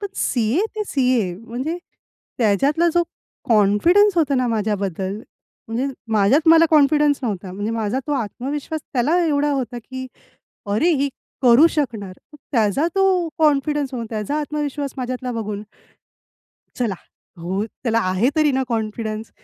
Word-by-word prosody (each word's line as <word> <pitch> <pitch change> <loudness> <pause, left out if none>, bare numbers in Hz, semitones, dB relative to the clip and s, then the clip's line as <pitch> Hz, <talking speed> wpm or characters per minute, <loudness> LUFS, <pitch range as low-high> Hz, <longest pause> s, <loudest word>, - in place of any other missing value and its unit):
पण 405 - -3
सी-ए 240 - +1 0.2
ते 430 - 0
सी-ए. 250 - +1
म्हणजे 245 - -5 0.6
त्याच्यातला 275 +10 +2
जो 345 - +4 0.5
कॉन्फिडन्स 245 - +4
होता 300 -4 +2
ना 255 -1 +1
माझ्याबद्दल, 200 -3 -2 0.5
म्हणजे 235 +4 -1 0.3
माझ्यात 220 +10 +3
मला 330 0 +7
कॉन्फिडन्स 295 -1 +4
नव्हता. 195 -6 -3
म्हणजे 205 +3 -3
माझा 225 +2 -1
तो 295 - -1
आत्मविश्वास 275 +5 -3
त्याला 285 +7 +2
एवढा 295 -1 +1
होता 250 -3 -3
की 260 0 -7 0.7
"अरे 260 +12 +2
ही 280 - +2 0.3
करू 250 +5 +7
शकणार." 225 - -2 0.2
मग - - -12 0.2
त्याचा 230 - +2
तो 380 -3 +2
कॉन्फिडन्स, 295 -2 +1
मग 235 -2 -3
त्याचा 220 +6 -2
आत्मविश्वास 290 -2 -3
माझ्यातला 255 0 -4
बघून 210 -3 -4 1.2
चला, 235 -6 0 0.4
हो 185 +5 -2 0.2
त्याला 230 -2 +1
आहे 190 +7 +2
तरी 305 -1 +4
ना 265 0 +1
कॉन्फिडन्स 220 -1 -3
255 Hz, 135 wpm, -21 LUFS, 215-295 Hz, 1.2 s, मला